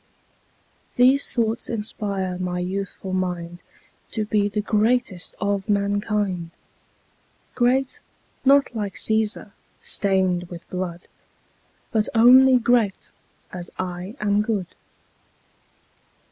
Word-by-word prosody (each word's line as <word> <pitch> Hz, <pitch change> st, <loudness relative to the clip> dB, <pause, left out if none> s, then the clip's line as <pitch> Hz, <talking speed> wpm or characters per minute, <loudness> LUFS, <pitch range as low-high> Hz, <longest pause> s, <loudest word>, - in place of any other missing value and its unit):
These 260 Hz, +3 st, +4 dB
thoughts 230 Hz, -1 st, -1 dB
inspire 200 Hz, -5 st, -3 dB
my 180 Hz, -1 st, -2 dB
youthful 190 Hz, +1 st, -4 dB
mind 175 Hz, -2 st, -3 dB, 0.5 s
To 215 Hz, -2 st, -1 dB
be 210 Hz, -1 st, +1 dB
the 210 Hz, +1 st, -2 dB
greatest 215 Hz, -2 st, 0 dB
of 200 Hz, 0 st, -1 dB
mankind: 200 Hz, -3 st, 0 dB, 1.0 s
Great, 260 Hz, +2 st, +1 dB, 0.4 s
not 275 Hz, -1 st, +4 dB
like 205 Hz, -3 st, -3 dB
Cæsar, 220 Hz, -1 st, +1 dB, 0.3 s
stained 185 Hz, -3 st, +1 dB
with 170 Hz, -1 st, -10 dB
blood, 180 Hz, -2 st, -4 dB, 0.9 s
But 220 Hz, -2 st, +1 dB
only 255 Hz, +3 st, +7 dB
great 235 Hz, -4 st, +1 dB, 0.4 s
as 175 Hz, -1 st, -6 dB
I 185 Hz, +3 st, -5 dB
am 205 Hz, 0 st, +2 dB
good. 210 Hz, -5 st, -2 dB
205 Hz, 95 wpm, -23 LUFS, 185-225 Hz, 1.0 s, only